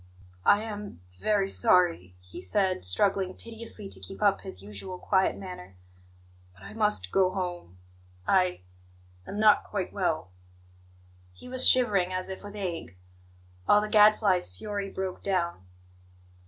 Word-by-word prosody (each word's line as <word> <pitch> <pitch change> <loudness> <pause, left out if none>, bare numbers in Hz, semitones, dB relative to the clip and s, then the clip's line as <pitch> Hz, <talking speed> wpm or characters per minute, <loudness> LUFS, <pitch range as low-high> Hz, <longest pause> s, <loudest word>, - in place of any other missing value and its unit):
"I 205 +1 +5
am 210 - -7 0.2
very 205 - +1
sorry," 175 - +2
he 90 0 -11
said, 185 - 0
struggling 190 - +1
piteously 225 -2 -8
to - - -7
keep 195 - -9
up 200 -2 +2
his 95 - -8
usual 105 - -6
quiet 190 +1 +1
manner, 140 - -9 0.8
"but 95 - -18
I - - -10
must 210 - +1
go 190 -1 +3
home. 175 - -5 0.5
I 185 - +2 0.7
am 205 - -5
not 215 -1 +5
quite 200 -3 -4
well." 165 - -1 1.0
He 90 - -13
was 255 0 +4
shivering 200 -8 +3
as 185 +1 -2
if 190 - -7
with 205 0 -10
ague. 170 - -5 0.7
All 205 - +6
the 210 0 -3
Gadfly's 210 - +4
fury 200 - -4
broke 190 -1 -5
down. 170 - -2
190 Hz, 140 wpm, -28 LUFS, 170-205 Hz, 1.0 s, All